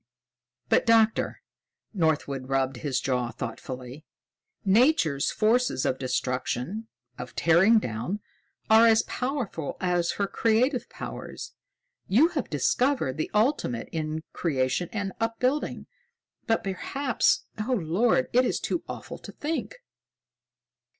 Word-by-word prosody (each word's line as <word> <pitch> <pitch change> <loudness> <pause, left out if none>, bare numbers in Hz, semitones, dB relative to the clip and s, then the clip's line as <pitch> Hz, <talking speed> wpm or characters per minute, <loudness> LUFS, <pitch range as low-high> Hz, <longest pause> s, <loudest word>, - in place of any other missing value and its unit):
"But - - +2
Doctor," 225 -1 +3 0.5
Northwood 145 -7 0
rubbed 135 -1 0
his 135 -1 -1
jaw 125 -3 -1
thoughtfully, 125 +4 -7 0.6
"Nature's 195 - +3
forces 225 - +1
of 130 - 0
destruction, 130 - -2 0.3
of 125 - -7
tearing 180 +8 +5
down, 125 - -2 0.5
are 220 +1 +7
as 225 -1 +5
powerful 250 - -3
as 175 -2 +1
her 200 - 0
creative 235 +5 +1
powers. - - -7 0.5
You 260 - +5
have - - -3
discovered 255 - +1
the 155 - -2
ultimate 210 - +1
in 155 0 -3
creation 145 +1 0
and 200 -3 -3
upbuilding. 250 +5 -1 0.6
But 225 - +1
perhaps 255 +7 0
oh, 230 +5 -1
Lord, 170 - +2
it 250 +1 +5
is - - 0
too 340 - -2
awful - - -7
to - - -10
think!" 320 +10 -4
190 Hz, 115 wpm, -27 LUFS, -, 0.6 s, are